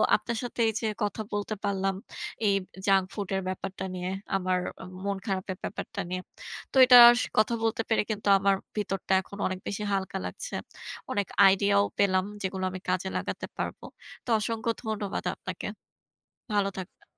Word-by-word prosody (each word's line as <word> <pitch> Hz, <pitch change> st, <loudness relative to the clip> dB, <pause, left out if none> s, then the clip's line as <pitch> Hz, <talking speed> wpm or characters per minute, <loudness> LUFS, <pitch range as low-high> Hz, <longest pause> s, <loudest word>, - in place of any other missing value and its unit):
আপনার 235 Hz, -1 st, -2 dB
সাথে 240 Hz, 0 st, -6 dB
এই 220 Hz, -, +1 dB
যে 220 Hz, -, 0 dB, 0.2 s
কথা 210 Hz, +1 st, -1 dB
বলতে 205 Hz, +1 st, -2 dB
পারলাম 195 Hz, -1 st, 0 dB, 0.5 s
এই 200 Hz, -, +4 dB, 0.3 s
junk 195 Hz, -2 st, +4 dB
food 200 Hz, -3 st, -4 dB
এর 190 Hz, -, 0 dB
ব্যাপারটা 190 Hz, 0 st, -4 dB
নিয়ে 180 Hz, 0 st, -3 dB, 0.3 s
আমার 185 Hz, -1 st, 0 dB, 0.5 s
মন 200 Hz, -1 st, 0 dB
খারাপের 190 Hz, -1 st, -2 dB
ব্যাপারটা -, -, -4 dB
নিয়ে, 185 Hz, 0 st, -2 dB, 0.5 s
তো -, -, -11 dB
এটা 250 Hz, -1 st, +9 dB, 0.2 s
স -, -, +1 dB
কথা 215 Hz, +2 st, +4 dB
বলতে 225 Hz, 0 st, +1 dB
পেরে 225 Hz, -, +3 dB
কিন্তু 210 Hz, -1 st, -4 dB
আমার 195 Hz, 0 st, +3 dB, 0.2 s
ভিতরটা 195 Hz, -2 st, -1 dB
এখন 200 Hz, +2 st, -11 dB
অনেক 185 Hz, 0 st, -4 dB
বেশি 210 Hz, +1 st, -3 dB
হালকা 190 Hz, 0 st, -1 dB
লাগছে। -, -, -6 dB, 0.6 s
অনেক 200 Hz, -2 st, 0 dB, 0.2 s
আইডিয়াও 200 Hz, +1 st, +4 dB, 0.2 s
পেলাম 185 Hz, -2 st, +3 dB, 0.2 s
যেগুলো 190 Hz, -1 st, -3 dB
আমি 185 Hz, -, -6 dB
কাজে 185 Hz, +1 st, 0 dB
লাগাতে -, -, -4 dB
পারবো। -, -, -4 dB, 0.4 s
তো -, -, -8 dB
অসংখ্য 225 Hz, +1 st, -1 dB
ধন্যবাদ 210 Hz, -3 st, -3 dB
আপনাকে। -, -, -6 dB, 0.9 s
ভালো 200 Hz, -1 st, +3 dB
থাকবেন। 185 Hz, -, -9 dB
200 Hz, 160 wpm, -28 LUFS, 190-210 Hz, 0.9 s, এটা